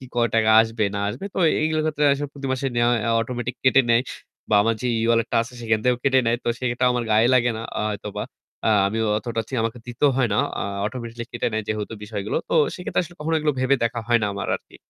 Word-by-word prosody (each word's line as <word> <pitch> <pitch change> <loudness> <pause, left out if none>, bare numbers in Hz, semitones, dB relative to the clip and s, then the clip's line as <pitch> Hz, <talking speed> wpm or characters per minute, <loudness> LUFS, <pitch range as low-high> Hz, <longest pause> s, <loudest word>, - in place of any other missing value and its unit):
কয় 120 -1 +2
টাকা 110 -1 +3
আসবে 115 0 -2
না - - -2
আসবে। 150 - -6
তো - - -7 0.2
এইগুলোর 155 0 +1
ক্ষেত্রে 150 -1 0
আসলে 145 +1 -3
প্রতি 140 -1 -6
মাসে 130 +1 -1
নেওয়া 120 0 +3 0.2
আ - - +2
automatic 120 +1 -4
কেটে 130 +1 +5
নেয়। 115 +1 +5 0.5
বা - - +1
আমার 115 0 +1
যে 125 - -3 0.2
E-wallet 115 0 +2
টা - - 0
আছে 115 - -12
সেখান 110 -1 +1
থেকেও 125 -1 +2
কেটে 135 -1 +4
নেয়। 115 +1 +2
তো - - -5
সেক্ষেত্রে 125 0 0
আমার 125 -1 -1
গায়ে 110 +2 +4
লাগে 120 -1 +4
না - - -5 0.2
আ - - 0
হয়তোবা। 105 0 -5 0.4
আ - - +4 0.2
আমিও 110 +2 -1
অতটা 115 0 -3
ঠিক 130 - -4
আমাকে 115 +2 -3
দিতেও 125 +4 +2
হয় 130 -3 +3
না। - - +1 0.2
আ - - -1 0.2
Automatically 120 0 -5
কেটে 120 - -1
নেয় 110 -1 -1
যেহেতু 105 0 -3
বিষয়গুলো 105 -1 -3
তো - - -1 0.2
সেক্ষেত্রে 180 - -1
আসলে 175 +1 -13
কখনো 160 +2 -1
এগুলো 150 -1 +1
ভেবে 130 +2 +3
দেখা 115 0 -1
হয় 120 -1 +4
না - - +1
আমার 100 - -4
আরকি। - - -20
120 Hz, 240 wpm, -23 LUFS, 115-130 Hz, 0.5 s, কেটে